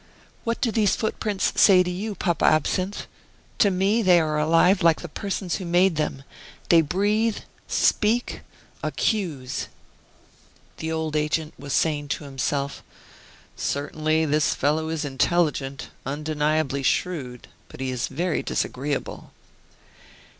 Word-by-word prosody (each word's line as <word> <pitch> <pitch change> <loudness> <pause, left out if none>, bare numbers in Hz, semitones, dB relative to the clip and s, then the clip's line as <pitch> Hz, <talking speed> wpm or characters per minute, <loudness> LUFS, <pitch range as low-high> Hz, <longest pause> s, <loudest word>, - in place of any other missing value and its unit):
What 230 0 -1
do 230 - +1
these 210 -3 +2
footprints 210 -2 -1
say 185 -3 +7
to 180 - -3
you, 205 +4 -4
Papa 175 -3 -1
Absinthe? 185 +6 +1 0.5
To 205 - +5
me 195 +4 +2
they 180 -4 +5
are 155 -2 0
alive 165 +5 +4
like 165 -1 +4
the 175 - -6
persons 190 +1 -3
who 190 - -6
made 175 +1 +3
them; 150 -3 -2 0.5
they 170 -1 +7
breathe, 205 +7 +1 0.3
speak, 230 +3 +1 0.4
accuse!" 165 - -2 1.1
The 160 0 -4
old 160 -1 -2
agent 155 +1 -1
was 140 0 -5
saying 150 -2 +1
to 145 - -3
himself: 140 0 -3 0.7
"Certainly, 155 +2 -1
this 150 0 +1
fellow 155 +2 0
is 160 -1 -2
intelligent, 140 -1 0
undeniably 150 0 -1
shrewd; 130 -4 -2 0.2
but - - -13
he 130 -1 -2
is 125 -2 -2
very 165 +4 -1
disagreeable." 140 +2 -3
160 Hz, 125 wpm, -24 LUFS, 145-185 Hz, 1.1 s, say